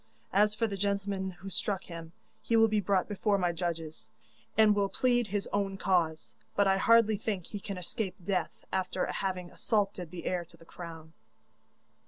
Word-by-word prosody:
As 210 +2 +4
for 230 - +1
the 200 -3 -3
gentleman 200 -1 -1
who 190 +1 -9
struck 195 0 -2
him, 165 -2 -8 0.3
he 230 - +1
will 225 0 +7
be 215 -1 +2
brought 195 -2 +1
before 205 0 +1
my 180 -2 +1
judges, 165 -2 -4 0.5
and 215 -1 +7
will 200 -1 +1
plead 245 -1 +2
his 200 0 -2
own 195 -1 0
cause, 170 -5 +1 0.2
but 200 - +4
I 195 0 +4
hardly 225 +1 +5
think 200 -4 -2
he 205 - -6
can 195 0 -5
escape 185 +2 -3
death, 185 -4 -2
after 185 -1 0
having 185 -2 -3
assaulted 200 -5 0
the 170 -1 -8
heir 180 -1 0
to 170 0 -18
the 165 - -17
crown. 165 -2 -9
195 Hz, 180 wpm, -31 LUFS, 175-205 Hz, 0.5 s, will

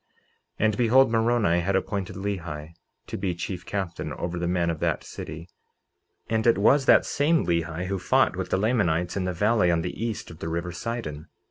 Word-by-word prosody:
49:16 - - +2
And 110 -1 +1
behold, 125 +2 +5
Moroni 115 -6 +2
had 95 +3 0
appointed 95 0 -2
Lehi 85 -6 -5 0.3
to - - -5
be 95 -2 -1
chief 90 0 -5
captain 95 -4 -3
over 85 0 -4
the 85 - -1
men 85 -1 +1
of 80 - -5
that - - 0
city; 80 +2 -8 0.8
and 110 +1 0
it 115 - +5
was 135 +7 +4
that - - +6
same 160 +3 +2
Lehi 85 0 -1
who 95 +1 -2
fought 90 - +2
with - - -4
the - - +1
Lamanites 90 -6 +1
in 95 -2 -1
the 90 - 0
valley 105 +1 +2
on 85 -1 +1
the - - -4
east 115 -6 -4
of 85 - -12
the 80 - -4
river 85 +2 -3
Sidon. 85 -6 -5
95 Hz, 200 wpm, -26 LUFS, 85-110 Hz, 0.8 s, that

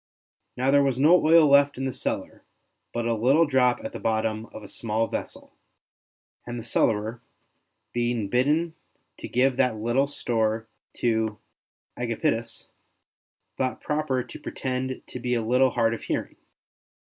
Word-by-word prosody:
Now 130 +2 +2
there 140 0 +5
was 135 -3 +1
no 160 +6 +5
oil 160 0 +6
left 140 0 +5
in 135 - -2
the 130 - -2
cellar - - -4 0.5
but 120 0 -2
a 115 - +1
little 135 +9 +4
drop 130 -4 +2
at - - -5
the - - -6
bottom 110 0 -1
of 110 - -11
a - - -9
small 110 +1 -1
vessel, - - -6 0.9
and 120 0 -4
the - - -7
cellarer, 110 0 0 0.7
being 120 -3 0
bidden 150 +9 +1 0.5
to - - -6
give 130 +1 +2
that 125 -4 +2
little 120 +6 +1
store 110 -5 -1 0.3
to 110 -2 0 0.6
Agapitus, 115 -1 -2 0.9
thought 130 -1 -1
proper 150 -4 -1
to 125 - -11
pretend 130 0 -4
to 125 - -8
be 125 0 -1
a 115 - 0
little 125 +3 +4
hard 115 -2 +1
of 115 - -5
hearing. - - -3
125 Hz, 150 wpm, -26 LUFS, 115-135 Hz, 0.9 s, oil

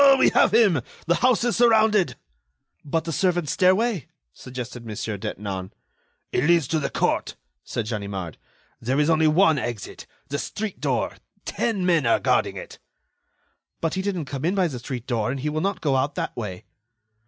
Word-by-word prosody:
"We - - +5
have - - +4
him. 205 - +4 0.2
The 170 +1 +2
house 250 -2 +4
is 240 -1 +1
surrounded." 220 -5 +4 0.7
"But 160 +2 -1
the 165 - -4
servant's 175 -2 +1
stairway?" 190 - +2 0.3
suggested 125 - -7
Mon. 110 -2 -6
Detinan. 100 -3 -4 0.6
"It 125 - +1
leads 170 -4 +4
to 160 - +1
the 140 - -2
court," - - 0 0.3
said 115 - -3
Ganimard. 100 - -4 0.4
"There 130 +5 0
is 150 +2 +3
only 160 0 +4
one 160 -1 +4
exit—the 120 +4 -6
street 215 -2 -4
door. - - -1 0.3
Ten 210 -6 -1
men 165 -8 +3
are 115 - +4
guarding - - +1
it." - - -9 1.0
"But 165 -1 -1
he 190 - -1
didn't 190 -5 -2
come 135 0 -5
in 175 +5 +1
by 185 -3 +2
the 130 -4 -6
street 120 0 -6
door, 120 -3 -1
and 135 +2 -2
he 150 - -1
will 155 +1 -2
not 195 -1 -1
go 140 -4 +1
out 140 +2 0
that - - -3
way." 95 -6 -6
150 Hz, 175 wpm, -24 LUFS, 120-185 Hz, 1.0 s, We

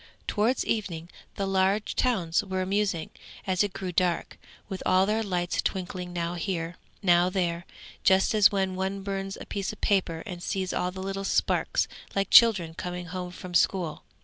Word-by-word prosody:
Towards 230 +5 +1
evening 175 -7 -2 0.3
the 195 - -1
large 195 +2 +1
towns 185 -9 +1
were 190 -2 -2
amusing 195 -3 -1 0.3
as 185 0 +2
it 205 - -2
grew 190 -1 -5
dark, 175 0 0 0.3
with 190 -2 -5
all 185 +1 +4
their 215 +2 +1
lights 180 -4 -1
twinkling 180 -1 -3
now 170 -1 -2
here, 175 -1 -3 0.3
now 175 -1 +5
there, 175 -2 -1 0.4
just 190 +2 +4
as 210 -2 +6
when 190 -2 0
one 190 +1 -2
burns 195 0 -3
a - - -8
piece 200 -2 -3
of 215 - -12
paper 180 -5 +1
and 180 -5 -7
sees 190 0 -2
all 180 - 0
the 190 +1 -7
little 195 0 -3
sparks - - +1 0.3
like 195 0 0
children 195 -9 +7
coming 180 +1 -5
home 180 -1 -4
from 180 0 -9
school. 175 -2 +1
190 Hz, 175 wpm, -27 LUFS, 175-195 Hz, 0.4 s, children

